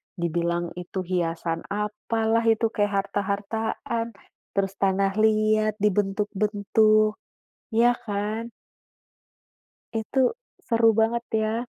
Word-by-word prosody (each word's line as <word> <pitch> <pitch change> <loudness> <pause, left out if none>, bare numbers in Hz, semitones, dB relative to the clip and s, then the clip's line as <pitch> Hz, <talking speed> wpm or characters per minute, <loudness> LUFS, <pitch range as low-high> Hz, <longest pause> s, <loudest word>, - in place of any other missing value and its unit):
dibilang 170 0 -1
itu 185 +1 -4
hiasan 165 -2 -2
apalah, 220 +2 0
itu 225 0 +3
kayak 205 -1 +1
harta-hartaan. 220 +3 -3 0.4
Terus 195 -1 0
tanah 195 0 +2
liat 215 0 +3
dibentuk-bentuk, 210 +1 +2 0.6
iya 235 +2 +5
kan. 215 +2 -3 1.4
Itu 225 +4 0 0.4
seru 230 -2 +4
banget 230 +1 +2
ya. 220 +2 0
210 Hz, 85 wpm, -25 LUFS, 195-225 Hz, 1.4 s, iya